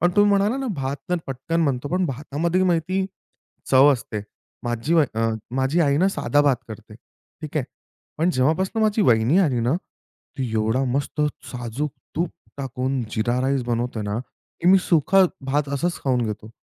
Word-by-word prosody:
पण 175 - +3
तुम्ही 205 0 +6
म्हणाला 200 +5 +2
ना 270 -1 -3
भात 135 0 -3
तर 180 - +3
पटकन 150 +6 -1
बनतो, 140 -1 -1
पण 180 +3 +1
भातामध्ये 150 +6 -1
माहिती 185 +2 +1 0.7
चव 135 +2 +7
असते. 110 -4 -4 0.4
माझी 120 +7 -1
बा 160 -3 +5 0.2
अ, 115 - +2 0.3
माझी 135 +6 +2
आई 140 -3 +3
ना 185 +6 +4
साधा 145 -6 +1
भात 140 -3 +3
करते, 110 0 -10
ठीक 150 +6 -12
आहे. 140 - +1 0.5
पण 170 +3 +3
जेव्हापासून 165 - +1
माझी 215 0 +2
वाहिनी 120 - +4
आली 135 -10 +2
ना, 120 +6 +1 0.6
ती 130 -3 -2
एवढा 110 +4 +1
मस्त 140 +4 -2 0.3
साजूक 125 +4 -3 0.3
तूप 170 0 0 0.3
टाकून 130 0 -2
जीरा 120 +3 0
राईस 135 -1 +1
बनवते 120 -1 -1
ना, 105 +2 -2 0.4
की 175 - +3
मी 190 +1 +7
सुका 185 +4 +5 0.2
भात 145 +1 0
असंच 175 +5 -1
खाऊन 125 -3 +2
घेतो. 105 0 -6
140 Hz, 170 wpm, -23 LUFS, 125-170 Hz, 0.7 s, चव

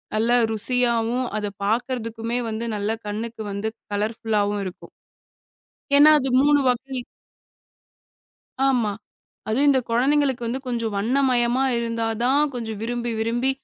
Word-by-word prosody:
நல்ல 225 +2 +1 0.2
ருசியாவும், 240 +1 +1
அத 210 - -2 0.2
பாக்குறதுக்குமே 230 +1 -2
வந்து 220 +1 -3
நல்ல 205 0 -2 0.2
கண்ணுக்கு 220 +2 -5
வந்து 200 +2 -3 0.3
கலர்ஃபுல்லாவும் 210 -1 -1
இருக்கும். 185 - -9 1.1
ஏன்னா 290 +2 +8
அது 270 -1 -1
மூணு 290 +1 +4
வாகி 260 +2 -1 1.7
ஆமா. 245 -6 +2 0.6
அது 220 +3 0
இந்த 265 -2 +4
கொழந்தைங்களுக்கு 265 +1 +2
வந்து 250 +3 -2
கொஞ்சம் 230 -3 -2
வண்ணமயமா 245 +2 +2 0.2
இருந்தாதான் 230 +3 0
கொஞ்சம் 225 -3 -5
விரும்பி, 240 +1 -2
விரும்பி 240 +4 0
235 Hz, 110 wpm, -23 LUFS, 220-255 Hz, 1.7 s, ஏன்னா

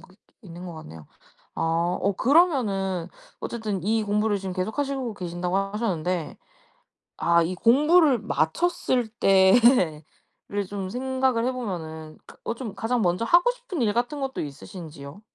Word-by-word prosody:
게 185 - -19 0.3
있는 175 -2 -10
것 175 - -7
같네요. 80 - -11 0.5
아 - - -5 0.4
어 200 +1 +1
그러면은 205 - +2 0.3
어쨌든 215 -6 -4
이 220 +3 +1
공부를 210 0 +1
지금 190 -1 -5
계속 185 +7 -3
하시고 270 -5 -2
계신다고 180 0 -3
하셨는데 190 -5 -2 0.8
아 170 0 +3
이 180 +3 -2
공부를 290 - +4
마쳤을 245 - 0
때를 195 - +2
좀 195 -1 -5
생각을 260 0 0
해보면은 165 -11 -5
그 - - -15
어 - - -2
좀 230 -5 -7
가장 235 +3 -1
먼저 180 +3 +1
하고 350 - +5
싶은 - - -6
일 210 -3 +2
같은 245 +6 -1
것도 270 -1 -3
있으신지요? 150 +2 -9
205 Hz, 290 characters per minute, -25 LUFS, 180-250 Hz, 0.8 s, 하고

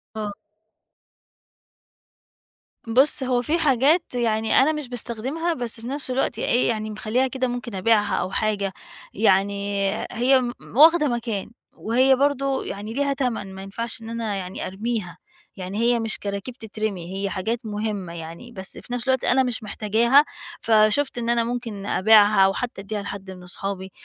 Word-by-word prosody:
آه. 210 -1 -3 2.6
بُصّ، 265 +5 +3
هو 250 -1 +1
فيه 305 +7 0
حاجات 300 +2 +2
يعني 220 -2 +2
أنا 275 +4 +4
مش 300 -3 -4
باستخدمها 255 +8 -2
بس 240 -5 -3
في 230 - -7
نفس 275 0 -4
الوقت 260 +2 -1
إيه 245 - +2
يعني 215 -2 -2
مخلّياها 215 +5 0
كده 260 0 -2
ممكن 240 -3 -5
أبيعها 210 +2 +2
أو 180 - -1
حاجة 200 -2 -1 0.4
يعني 200 -1 +1
آآ، - - -4
هي 255 +3 +3
م 240 0 -7
واخدة 320 +1 +7
مكان 230 -5 -3 0.2
وهي 255 +4 +3
برضه 275 0 +1
يعني 205 +3 -6
ليها 280 +2 +1
تمَن 235 -8 -3
ما 190 - -8
ينفعش 225 +4 -4
إن 225 - -8
أنا 230 -3 -3
يعني 185 -1 -5
أرميها، 195 -3 -4 0.4
يعني 190 +2 -5
هي 235 +1 +2
مش 225 -1 -1
كراكيب 200 +4 -5
تترمي، 215 -6 -5
هي 200 0 -1
حاجات 220 +6 -2
مهمة 210 -4 -4
يعني، 170 +8 -9
بس 190 -4 -4
في 245 - -8
نفس 245 +1 -3
الوقت 260 -1 +2
أنا 265 +1 +3
مش 245 -2 -1
محتاجاها 225 +6 +3 0.4
فشُفت 220 +5 +3
إن 235 -1 -2
أنا 235 -1 +3
ممكن 230 -4 -4
أبيعها، 210 0 +5
أو 195 - +2
حتى 240 -2 -4
أدّيها 205 +1 -4
لحد 200 -1 -7
من 180 -1 -11
أصحابي 190 +1 -5
225 Hz, 160 wpm, -23 LUFS, 200-250 Hz, 2.6 s, واخدة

